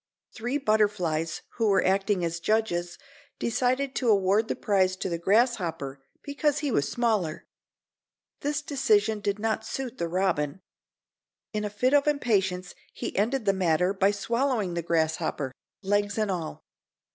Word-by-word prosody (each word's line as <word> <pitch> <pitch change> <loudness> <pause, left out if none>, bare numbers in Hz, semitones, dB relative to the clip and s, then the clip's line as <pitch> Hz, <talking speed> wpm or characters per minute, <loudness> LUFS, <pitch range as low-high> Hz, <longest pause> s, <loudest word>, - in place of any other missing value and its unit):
Three 245 +4 -2
butterflies 205 - 0
who 225 -2 +2
were 200 -2 +3
acting 195 -1 +2
as 170 0 -3
judges 175 -4 0 0.4
decided 255 +3 0
to 245 - +1
award 200 +1 +3
the - - -1
prize 190 -2 +2
to 185 - -3
the 170 -1 -2
grasshopper 170 - +1 0.2
because 290 0 0
he 295 -3 -1
was 140 -10 +1
smaller. 215 -10 0 0.9
This 295 +1 -2
decision 220 -7 +2
did 200 0 -1
not 220 +1 -1
suit 260 0 -5
the 170 - 0
robin. 175 -2 0 0.9
In 210 0 -1
a 210 - -2
fit 250 +6 +1
of 290 0 +4
impatience 195 -10 +1 0.2
he - - -5
ended 230 +4 0
the 195 - +4
matter 180 0 +2
by 195 0 +3
swallowing 230 -1 0
the 170 - -1
grasshopper—legs 170 - -1
and 215 -2 +1
all. 170 -4 -4
205 Hz, 145 wpm, -27 LUFS, 180-235 Hz, 0.9 s, of